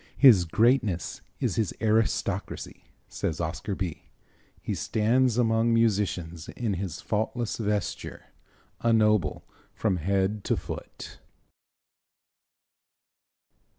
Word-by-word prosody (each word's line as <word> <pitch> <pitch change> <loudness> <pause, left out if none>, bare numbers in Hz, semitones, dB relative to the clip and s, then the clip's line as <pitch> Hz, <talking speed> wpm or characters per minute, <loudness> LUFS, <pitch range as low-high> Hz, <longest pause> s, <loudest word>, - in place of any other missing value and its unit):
"His 115 -11 +7
greatness 110 -1 +1 0.2
is - - -1
his 110 -5 0
aristocracy," 110 0 -1 0.2
says 80 - -3
Oscar 85 +4 -3
Bie. 90 -5 -4 0.6
"He - - -3
stands 120 +2 +1
among 115 -1 +3
musicians 95 -8 0
in 115 -4 -2
his 95 -2 -4
faultless 110 +2 -2
vesture, 105 -4 -3 0.5
a 115 - +2
noble 105 -8 +2 0.3
from 100 -5 0
head 95 +4 0
to - - +1
foot." - - -8
105 Hz, 95 wpm, -27 LUFS, 95-115 Hz, 0.6 s, His